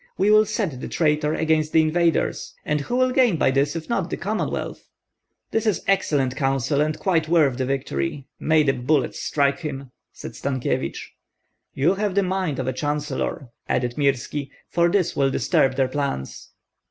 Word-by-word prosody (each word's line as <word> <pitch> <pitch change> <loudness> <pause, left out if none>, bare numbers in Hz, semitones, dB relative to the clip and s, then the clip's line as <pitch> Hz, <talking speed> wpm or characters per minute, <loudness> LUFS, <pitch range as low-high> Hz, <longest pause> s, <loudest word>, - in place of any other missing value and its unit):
We 200 +2 +3
will 215 0 +6
set 190 - -2
the - - -4
traitor 150 -1 +1
against 155 -1 +1
the 160 - +6
invaders; 165 +1 0
and 150 -1 0
who 240 - -3
will 255 0 +3
gain 250 -9 +3
by 135 - +3
this, 140 +3 +1
if 165 -1 -5
not 195 -7 -1
the - - -3
Commonwealth?" 215 +4 -3 0.6
"This 225 0 0
is 205 -6 0
excellent 145 -9 +1
counsel, 135 +1 0
and 155 +1 0
quite 165 -5 +1
worth 150 -6 +3
the 130 - 0
victory. 130 - -2
May 155 -1 +3
the 135 -2 +2
bullets 130 +1 0
strike 140 -1 +1
him!" 140 -5 -6 0.2
said - - -9
Stankyevich. 130 -2 -3 0.6
"You 150 +7 +3
have 200 -1 -2
the 200 - +3
mind 185 -6 -1
of 130 - -2
a 130 - 0
chancellor," 145 -1 -3 0.2
added 120 -1 0
Mirski, 140 0 -1 0.2
"for 170 0 +2
this 185 -1 +1
will 135 -1 +2
disturb 135 0 +2
their 135 -1 +2
plans." 130 - -4
150 Hz, 175 wpm, -23 LUFS, 135-175 Hz, 0.6 s, will